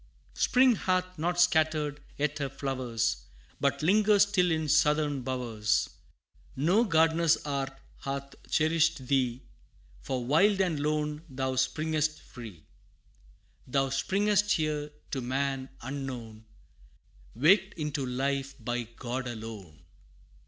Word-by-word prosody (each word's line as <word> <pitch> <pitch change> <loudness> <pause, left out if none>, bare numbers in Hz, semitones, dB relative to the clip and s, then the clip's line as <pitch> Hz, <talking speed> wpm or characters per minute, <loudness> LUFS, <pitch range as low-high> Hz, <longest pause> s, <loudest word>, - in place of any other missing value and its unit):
Spring 255 0 +4
hath 185 -2 -1
not 175 +2 0
scattered 155 -4 +2 0.2
yet 150 +1 -1
her 140 -1 -2
flowers, 125 -4 -2 0.3
But - - 0
lingers 205 +3 +5
still 180 -3 +2
in 160 -1 0
southern 150 -1 +2
bowers; 115 -5 -1 0.7
No 180 - +3
gardener's 165 -2 +3
art 135 -2 -3 0.2
hath 140 0 -5 0.2
cherished 155 -3 +2
thee, 125 -2 0 0.6
For 125 - -3
wild 190 - +4
and 175 -6 +1
lone 150 0 -1
thou 130 0 -2
springest 155 +3 0
free. 105 -10 -11 1.0
Thou 135 +1 +1
springest 205 +8 +2
here 150 -2 -1 0.2
to 135 - -2
man 135 +1 -2
unknown, 125 -5 -6 0.9
Waked 190 - +4
into 150 -3 -3
life 135 +2 -2
by 120 -1 -3
God 125 +1 -4
alone! 110 -9 -8
145 Hz, 110 wpm, -29 LUFS, 130-160 Hz, 1.0 s, lingers